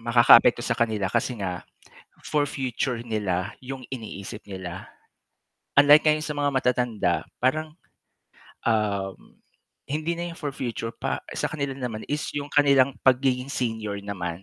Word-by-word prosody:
makakaapekto 120 0 +6
sa - - +1
kanila 110 -5 0
kasi 125 - 0
nga 90 -4 -3 0.7
for 150 -1 +1
future 130 -3 -2
nila 100 -3 -2
yung 130 0 -7
iniisip 110 -4 -7
nila. 95 -3 -8 0.9
Unlike 145 +2 +8
ngayon 155 0 +3
sa 150 - -3
mga 145 0 +2
matatanda, 125 -8 +1 0.3
parang, 155 +4 0 0.9
um, 100 -4 -1 0.5
hindi 155 +4 -2
na 175 0 -4
yung 165 - -13
for 145 - -2
future 120 -4 -4
pa 115 - -4
sa - - -1
kanila 140 -3 -3
naman 120 -5 -4
is 150 +1 -1
yung 145 0 -3
kanilang 140 -2 +4
pagiging 130 0 +3
senior 110 -4 -2
naman. 95 -3 -5
125 Hz, 135 wpm, -25 LUFS, 105-140 Hz, 0.9 s, Unlike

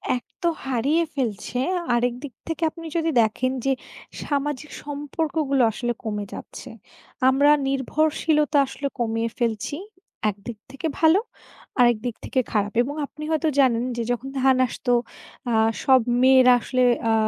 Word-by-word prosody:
এক 245 - -5 0.2
তো 345 - +1 0.2
হারিয়ে 270 +6 +1
ফেলছে। 245 -2 -3 0.4
আরেক 240 0 +1
দিক 275 - -7
থেকে 325 +1 -3
আপনি 330 +1 -11
যদি 325 0 +1
দেখেন, 235 +4 0
যে 270 - +3 0.5
সামাজিক 295 0 -2
সম্পর্কগুলো 290 -1 -1
আসলে 240 +2 -2
কমে 210 -2 -3
যাচ্ছে। - - -9 0.6
আমরা 280 +2 +4 0.2
নির্ভরশীলতা 300 +2 +1
আসলে 280 +1 -4
কমিয়ে 225 0 0
ফেলছি। 235 +3 -1 0.5
এক 200 - -4
দিক 235 - -6
থেকে 275 +4 -4
ভালো, 325 +4 +5 0.6
আরেক 240 -2 +5
দিক 240 -3 -2
থেকে 260 - 0
খারাপ। 205 -1 0
এবং 280 +4 -3
আপনি 305 +2 -11
হয়তো 315 0 +1
জানেন 240 -3 +3
যে, - - -1
যখন 245 +2 -3
ধান 265 0 +4
আসত, 250 - -10 0.6
আ - - 0 0.3
সব 260 -1 +5 0.2
মেয়েরা 260 -1 +7
আসলে 255 +1 0 0.3
আ - - +3
265 Hz, 145 wpm, -23 LUFS, 240-295 Hz, 0.6 s, মেয়েরা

